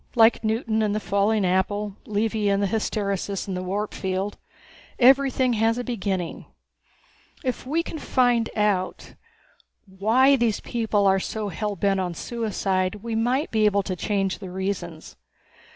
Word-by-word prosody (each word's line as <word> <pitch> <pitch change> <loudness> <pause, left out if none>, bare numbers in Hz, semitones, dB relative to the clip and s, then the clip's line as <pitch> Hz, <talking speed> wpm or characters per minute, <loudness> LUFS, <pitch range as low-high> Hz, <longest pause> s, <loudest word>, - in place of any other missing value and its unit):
Like 225 0 +5
Newton 220 0 0
and 210 -1 +1
the - - 0
falling 205 0 +1
apple, 195 +2 0
Levy 215 0 0
and 200 0 +2
the - - +3
hysteresis 200 -2 -2
in 195 - -3
the 180 - -3
warp 200 +3 -3
field. 190 +1 -2 0.6
Everything 260 -1 +4
has 225 +1 +2
a 245 - -2
beginning. 195 -7 -3 1.0
If 255 -1 -3
we 325 +5 +1
can 320 - -6
find 245 -4 +2
out 205 -3 -1 0.7
why 220 +8 +3
these 230 -4 +1
people 220 -3 0
are 195 0 +4
so 210 +2 -3
hell 205 +3 -3
bent 195 +1 +1
on 180 -2 -2
suicide 195 -5 -1
we 230 -1 -4
might 245 +6 0
be 220 -1 +2
able 200 -1 +2
to 185 -1 -3
change 195 0 -1
the 190 - -7
reasons. 180 -3 -5
210 Hz, 150 wpm, -24 LUFS, 195-230 Hz, 1.0 s, Like